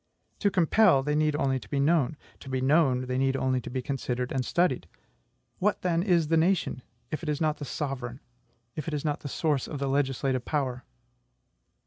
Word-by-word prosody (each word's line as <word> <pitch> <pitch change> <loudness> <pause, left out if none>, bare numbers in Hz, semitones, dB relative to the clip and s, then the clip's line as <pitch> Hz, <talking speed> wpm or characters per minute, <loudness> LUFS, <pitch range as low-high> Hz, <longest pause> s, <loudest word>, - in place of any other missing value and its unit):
To 205 - +3
compel, 180 -4 +4
they 150 +1 0
need 150 0 +2
only 135 -2 +1
to - - -14
be 140 - -1
known; 150 -1 +2 0.2
to 135 - -10
be 130 0 -1
known, 130 -2 +3
they 125 0 -1
need 135 0 +2
only 130 -1 0
to - - -7
be 130 0 -3
considered 125 -2 -2
and 130 -1 0
studied. 175 +8 +1 0.7
What, 205 +1 +1
then, 170 -2 +2
is 175 -5 +2
the 165 - +4
nation, 165 -6 +1 0.3
if 155 - -3
it 165 - -4
is 150 -1 -1
not 155 -2 +1
the 145 - -6
sovereign, 135 -3 -4 0.6
if 155 - -5
it 155 - -1
is 145 - -4
not 150 -1 0
the 140 - -6
source 150 -2 0
of 150 - -5
the 140 - -2
legislative 135 -2 0
power? 130 -4 -2
145 Hz, 200 wpm, -28 LUFS, 130-160 Hz, 0.7 s, compel